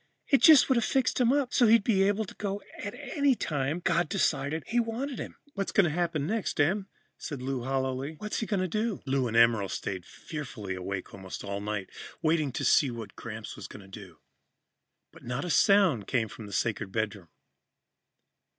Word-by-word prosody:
It 275 - +4
just 310 -4 +8
would 265 - +3
have 235 - +2
fixed 260 +1 +1
him 240 0 +4
up 275 -3 +1
so 245 - +5
he'd 225 -1 +6
be 200 -3 +2
able 205 +2 +2
to - - -11
go 200 -1 -3 0.2
any 275 +5 0
time 145 - -2
God 170 -2 +1
decided 145 +2 0
He 240 - +1
wanted 240 +4 -2
him." - - -6 0.2
"What's 195 -1 -2
going 200 - +5
to 170 - +1
happen 165 -3 -1
next, 215 -2 -2
Em?" 190 +7 +2 0.3
said 145 -5 -5
Lou 130 -1 -3
hollowly. 135 +2 -2
"What's 210 +4 -3
he 220 - -3
going 200 -3 0
to 185 - 0
do?" 215 +2 -2
Lou 135 -2 +1
and 115 0 -1
Emerald 115 -4 +4
stayed 95 -2 -4
fearfully 130 -11 -6
awake 95 +1 -5
almost 95 -2 -8
all 100 0 -4
night, 105 -2 -3 0.3
waiting 155 -3 +1
to - - -2
see 140 - +5
what 115 -3 -7
Gramps - - -7
was - - -8
going 100 - -11
to 100 - -8
do. 95 -5 -13 0.9
But - - -16
not 125 +5 -3
a 175 - -2
sound 185 - +4
came 110 -4 0
from 110 - -9
the - - -10
sacred 105 -3 -1
bedroom. 105 -4 -3
155 Hz, 195 wpm, -29 LUFS, -, 0.9 s, just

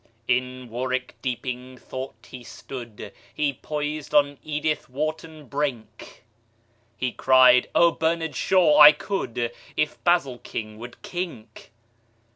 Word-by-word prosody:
In 125 0 -1
warwick 125 +2 -3
deeping 125 0 -4
thought 130 -2 -8
he 125 -1 -10
stood 120 -3 -9 0.2
He 145 -2 -1
poised 150 +1 -4
on 145 -1 +4
edithwharton 155 0 -3
brink; 140 -4 -5 0.7
He 125 -1 -1
cried, 130 -1 +5
"Ohbernardshaw! 165 0 +3
I 150 0 +11
could 125 - -3 0.3
If 150 - -1
basilking 125 -10 -1
would 120 +1 -11
kink." 165 -12 -7
135 Hz, 95 wpm, -24 LUFS, 125-155 Hz, 0.7 s, I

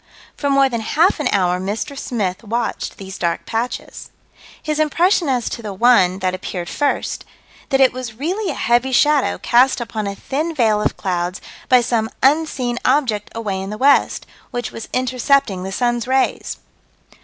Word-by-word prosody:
For 285 - -2
more 275 -1 +4
than 235 -3 -3
half 320 - +2
an 295 - 0
hour 180 -2 +2
Mr. 205 +9 -4
Smith 210 -8 -3
watched 230 +2 -3
these 190 0 -8
dark 170 -1 -1
patches 235 +2 -4 0.5
His 305 -1 -2
impression 335 +2 +2
as 250 -3 0
to - - -6
the 210 -3 -6
one 190 -5 +4
that 185 - +1
appeared 180 -1 -5
first: 290 -1 -1 0.5
That 270 -2 +2
it 265 -2 +5
was 250 -3 -6
"really 360 - -2
a - - -5
heavy 240 +3 +1
shadow 290 +1 +3
cast 250 +3 +3
upon 220 -3 -4
a 200 - -4
thin 310 +9 -3
veil 220 -5 +2
of - - -1
clouds 180 0 -2 0.3
by 250 -1 +6
some 230 -2 0
unseen 270 -4 +1
object 220 -8 +1
away 205 -4 -3
in 195 - -5
the 210 - -5
west, 275 +4 +3 0.2
which 245 -1 -4
was 225 - -8
intercepting 255 -4 +1
the 190 +1 -5
sun's 240 +2 0
rays." 265 0 0
240 Hz, 170 wpm, -19 LUFS, 210-275 Hz, 0.5 s, by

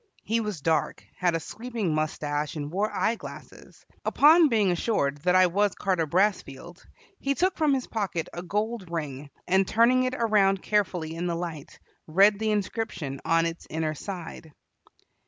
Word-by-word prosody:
He 225 +2 0
was 210 -8 -4
dark, 160 +1 0
had 175 -2 +1
a - - 0
sweeping 225 -2 -4
mustache, 150 0 -2
and 145 -1 -5
wore 200 +4 0
eye 225 - +1
glasses. 230 - -12 0.2
Upon 315 +2 +6
being 210 -6 +2
assured 155 -6 0
that 180 +4 +2
I 185 0 +7
was 200 +3 +1
Carter 180 -5 0
Brassfield, 175 -2 -1 0.4
he 275 0 -1
took 370 +5 +1
from 310 -3 +2
his 260 - -3
pocket 195 -7 -3
a 175 - -5
gold 210 +1 -3
ring, 150 -4 -5 0.2
and, 190 +1 +3
turning 235 +3 +4
it 255 0 -1
around 205 -5 +2
carefully 180 -6 0
in 170 +2 -3
the 170 - -1
light, 165 -4 -6 0.3
read 200 +5 +4
the 220 0 0
inscription 190 - -3
on 165 0 +3
its 165 0 -5
inner 155 -1 -2
side. 165 -1 -8
185 Hz, 165 wpm, -26 LUFS, 160-215 Hz, 0.4 s, I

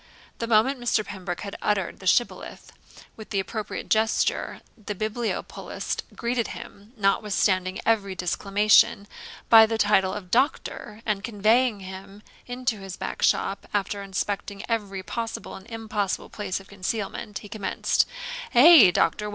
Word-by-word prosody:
The 230 - -2
moment 235 +4 +3
Mr. 235 -3 +1
Pembroke 180 -3 -6
had 200 -2 -6
uttered 195 -4 -1
the 190 - -7
Shibboleth, 240 +6 0 0.4
with 220 - -11
the 200 - 0
appropriate 215 +2 -5
gesture, 220 0 +1
the 210 -1 -6
bibliopolist 215 +3 -3
greeted 235 -2 -1
him, 205 +4 -12
notwithstanding 195 -2 +1
every 200 -4 +1
disclamation, 200 +2 +3 0.4
by 225 -1 +8
the 225 0 -1
title 205 -3 +3
of 185 -3 -8
Doctor, 230 -4 -1
and 210 -3 -1
conveying 220 +1 +2
him 190 +2 -10 0.2
into 245 -2 -2
his 195 -1 -8
back - - -5
shop, 195 - +1
after 200 0 -1
inspecting 200 +1 -4
every 200 -5 -2
possible 230 +3 -5
and 190 - -11
impossible 215 -4 -3
place 205 -3 -3
of 195 - -15
concealment, 200 +1 -4
he 210 - -9
commenced: 205 -1 0 0.5
'Eh, 270 - +9
Doctor! 210 +4 +1
210 Hz, 135 wpm, -25 LUFS, 195-225 Hz, 0.5 s, Eh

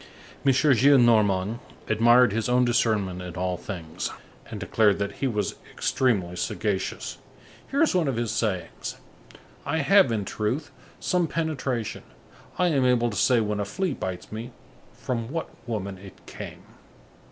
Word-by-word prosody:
M. 135 - +5
Gillenormand 120 -7 +4 0.3
admired 120 +1 +5
his 115 +1 -1
own 125 0 +4
discernment 105 -6 +1
in 90 -1 -7
all 90 0 -1
things, 85 -2 -5 0.4
and 110 -3 -6
declared 105 +1 +3
that 100 0 -2
he 135 - +2
was 105 -4 -1 0.2
extremely 100 -9 0
sagacious; 95 +1 -2 0.5
here 280 +4 +2
is 320 - +2
one 175 -5 +2
of 135 - 0
his 115 -1 -1
sayings: 100 -6 -2 0.7
"I 160 - -1
have, 190 0 +5
in 105 -3 -1
truth, 120 +10 -2 0.3
some 180 -2 +1
penetration; 140 -8 -2 0.6
I 180 -1 +3
am 140 -5 +2
able 120 -2 +3
to - - -6
say 120 +5 +3
when 105 -1 -1
a - - +1
flea 185 - -2
bites 95 -7 -5
me, 110 +3 -5 0.4
from 115 -2 -4
what 165 +1 -3 0.2
woman 100 -4 -4
it 95 -1 -14
came." - - -9
115 Hz, 150 wpm, -26 LUFS, 100-130 Hz, 0.7 s, M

